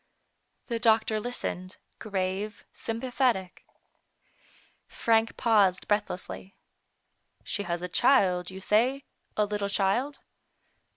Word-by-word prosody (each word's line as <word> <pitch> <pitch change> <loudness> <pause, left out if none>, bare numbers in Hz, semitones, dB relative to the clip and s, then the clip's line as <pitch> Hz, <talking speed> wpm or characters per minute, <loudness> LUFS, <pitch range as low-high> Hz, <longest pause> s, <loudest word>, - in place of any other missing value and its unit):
The 235 -2 -2
doctor 220 -1 +3
listened, 195 -5 -4 0.2
grave, 200 +1 -3
sympathetic. 230 -4 -1 1.2
Frank 225 0 +1
paused 205 -5 +3
breathlessly. 200 -2 -2 0.4
" - - -47 0.3
She 205 - -3
has 170 +1 -2
a - - -2
child, 180 -4 +3
you 190 0 -9
say 245 +8 +2 0.2
— - - -45
a 210 - +3
little 205 -1 -2
child? 210 +9 +1
210 Hz, 105 wpm, -28 LUFS, 190-230 Hz, 1.2 s, doctor